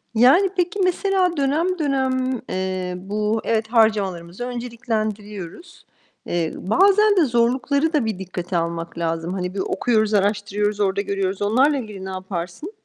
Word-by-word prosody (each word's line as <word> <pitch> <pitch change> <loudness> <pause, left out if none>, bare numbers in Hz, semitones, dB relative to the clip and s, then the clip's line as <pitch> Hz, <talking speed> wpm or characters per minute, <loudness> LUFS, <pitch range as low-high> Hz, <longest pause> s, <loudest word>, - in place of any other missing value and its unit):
Yani 280 - +6
peki 360 +3 0
mesela 365 -2 +1
dönem 320 +6 +1
dönem, 260 -3 0
eee, 185 -1 -2
bu 210 +4 -1
evet, 220 -1 0
harcamalarımızı 205 -3 +1
önceliklendiriyoruz. 225 - -5 0.4
Eee, 170 -2 -1
bazen 400 - +4
de 335 - +5
zorlukları 260 +6 +1
da 285 -7 +2
bir 215 -4 -3
dikkate 180 -1 -4
almak 170 0 -3
lazım. 165 +1 -2
Hani, 180 -1 -3
bir - - -3
okuyoruz, 220 +1 +1
araştırıyoruz, 205 0 0
orada 200 0 +1
görüyoruz. 195 -1 -2
Onlarla 260 +8 +3
ilgili 210 -6 -7
ne - - -5
yaparsın? 185 - -5
215 Hz, 135 wpm, -22 LUFS, 190-270 Hz, 0.4 s, Yani